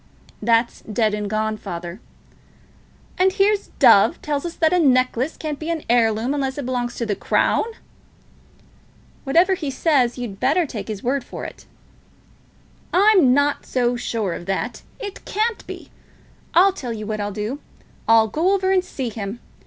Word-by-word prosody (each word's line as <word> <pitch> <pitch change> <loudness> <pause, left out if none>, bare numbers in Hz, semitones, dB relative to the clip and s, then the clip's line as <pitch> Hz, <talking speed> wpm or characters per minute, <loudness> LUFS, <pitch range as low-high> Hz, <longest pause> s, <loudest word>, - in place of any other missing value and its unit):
"That's 230 +2 +1
done 215 0 0
and 210 -1 -3
gone, 215 0 -1
father." 175 0 -7 1.2
"And 375 +1 +4
here's 405 +1 +2
Dove - - +6
tells 295 +2 -2
us 340 - -8
that 320 +1 +2
a 360 - +4
necklace 255 -1 +2
can't 305 -2 -4
be 315 - -5
an 330 -2 -2
heirloom, 230 +1 +2
unless 270 -2 -2
it 285 - -4
belongs 245 -1 -2
to 235 - -3
the 215 - -1
Crown." - - +1 1.6
"Whatever 340 +8 +4
he 315 -6 -3
says, 265 -3 +1
you'd 230 -6 -6
better 350 +1 +2
take 220 -8 -6
his 210 -3 -6
word 265 +2 0
for - - -8
it." - - -10 1.2
"I'm 380 -8 +5
not 285 0 +1
so 245 -1 +1
sure 225 -6 -2
of 175 - -8
that. 215 +5 -2 0.2
It 410 -4 -7
can't 440 +2 -1
be. - - -9 0.6
I'll 375 +3 +6
tell 245 -10 -5
you 215 -1 -6
what 215 0 -3
I'll 205 0 -2
do. 215 +7 -4 0.5
I'll 225 -1 +5
go 335 - +1
over 380 -1 0
and 375 -1 +3
see 265 -8 -4
him. 210 +1 -6
255 Hz, 165 wpm, -21 LUFS, 220-325 Hz, 1.6 s, Dove